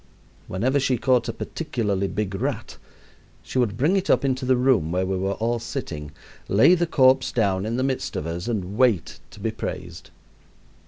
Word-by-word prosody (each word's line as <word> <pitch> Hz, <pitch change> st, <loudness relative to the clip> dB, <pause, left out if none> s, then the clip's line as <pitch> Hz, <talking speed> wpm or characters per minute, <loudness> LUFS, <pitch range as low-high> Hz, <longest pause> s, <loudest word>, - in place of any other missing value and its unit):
Whenever 130 Hz, +9 st, +1 dB
she 130 Hz, -2 st, +1 dB
caught 125 Hz, -1 st, +2 dB
a -, -, +1 dB
particularly 105 Hz, -, -2 dB
big 100 Hz, 0 st, -3 dB
rat, 95 Hz, -, -3 dB, 0.7 s
she 130 Hz, -, -2 dB
would 105 Hz, -5 st, 0 dB
bring 150 Hz, +10 st, +2 dB
it 195 Hz, 0 st, -1 dB
up -, -, +3 dB
into 130 Hz, -1 st, 0 dB
the 130 Hz, -, +4 dB
room 120 Hz, -11 st, +2 dB
where 90 Hz, +1 st, 0 dB
we 95 Hz, +1 st, -1 dB
were 95 Hz, +1 st, -1 dB
all 115 Hz, +3 st, -1 dB
sitting, 85 Hz, -, -5 dB, 0.4 s
lay 110 Hz, -, +5 dB
the 175 Hz, -1 st, +2 dB
corpse 130 Hz, -3 st, +4 dB
down 100 Hz, -3 st, 0 dB
in 115 Hz, +2 st, -2 dB
the 130 Hz, -, 0 dB
midst 135 Hz, -1 st, -2 dB
of 75 Hz, -, -3 dB
us, 85 Hz, +5 st, -4 dB
and 105 Hz, -2 st, -3 dB
wait 120 Hz, -10 st, +2 dB
to -, -, -14 dB
be -, -, -1 dB
praised. -, -, -6 dB
115 Hz, 190 wpm, -24 LUFS, 95-130 Hz, 0.7 s, lay